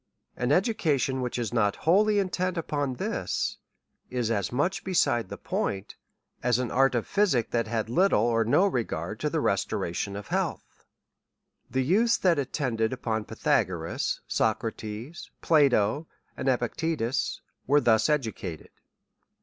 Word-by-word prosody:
An 125 +2 -1
education 150 - +1
which 125 -1 -3
is 120 -1 -3
not 105 -4 +2
wholly 205 +5 +4
intent 185 -2 0
upon 145 -5 -2
this, - - -2 0.5
is 120 -3 -1
as 100 -4 -1
much 145 +10 0
beside 120 - +1
the - - -6
point, 95 0 -3 0.5
as 125 -1 +2
an 125 -1 -2
art 135 0 +3
of 120 - 0
physic, 185 - +1
that 115 -2 0
had 110 -1 -1
little 170 - +3
or 115 -1 +2
no 120 - +4
regard 125 - -2
to - - 0
the - - -1
restoration 95 +4 -1
of 100 0 -7
health. - - -3 0.8
The 130 0 0
youths 220 - +3
that 175 -5 +2
attended 125 -5 -1
upon 110 -4 -2
Pythagoras, - - -1
Socra 110 +1 0
tes, 110 +10 -8
Plato, 140 -2 +3 0.3
and 135 - -1
Epictetus, 130 +1 -1 0.3
were 145 +3 +5
thus 110 -3 +3
educated. 110 - -2
125 Hz, 140 wpm, -27 LUFS, 115-160 Hz, 0.8 s, were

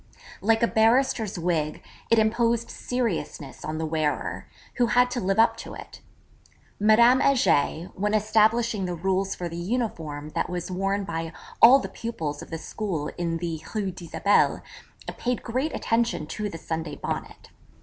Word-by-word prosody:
Like 225 +3 +2
a - - +5
barrister's 225 -2 +2
wig 165 -3 -1 0.3
it 230 - +4
imposed 230 +1 +2
seriousness 170 - -3
on 155 +1 -3
the 160 - -2
wearer, 155 -2 -2 0.3
who 245 -2 +3
had 245 +3 +3
to 250 - -1
live 195 +1 0
up 225 +1 +5
to - - -8
it. - - -11 0.8
Madame 235 +5 +6
Heger, 190 - +2
when 210 +2 0
establishing 215 0 +2
the 180 -1 -3
rules 190 +2 0
for 175 - -4
the 170 0 -7
uniform 170 -8 -3
that - - -1
was 180 0 -4
worn 195 +2 -1
by 165 -2 -4 0.3
all 250 +4 +10
the 275 - -4
pupils 160 -11 -5
of - - -10
the 165 - -4
school 165 -3 -4
in 165 -1 -1
the 165 -2 -4
Rue 200 -3 -1
d'Isabelle, 185 +3 +1 0.5
paid 245 0 -2
great 260 +6 -1
attention 230 -8 0
to 210 +6 -4
the 165 - -7
Sunday 160 -1 -4
Bonnet. - - -6
200 Hz, 160 wpm, -25 LUFS, 165-230 Hz, 0.8 s, all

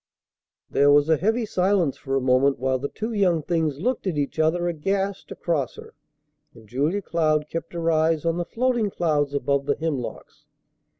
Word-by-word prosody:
There 145 +1 +4
was 145 +1 +4
a 160 - +4
heavy 220 - 0
silence 185 -6 +1
for 135 -1 -4
a - - +3
moment 130 +2 +3
while 130 +1 0
the 140 +2 -3
two 220 +2 -5
young 180 -6 +2
things 160 -4 -1
looked 245 +2 -1
at 170 -5 -1
each 145 +2 -2
other 170 +3 +2
aghast 195 +4 -2
across 150 -7 -2
her, - - -12 0.6
and 110 -2 -16
Julia 150 - -1
Cloud 155 -3 +1
kept 165 +3 -6
her 165 -1 0
eyes 160 0 +1
on 165 0 +1
the 175 - -2
floating 240 -1 0
clouds 150 -6 0
above 140 0 0
the 140 - +2
hemlocks. 150 -7 -5
160 Hz, 180 wpm, -24 LUFS, 140-180 Hz, 0.6 s, There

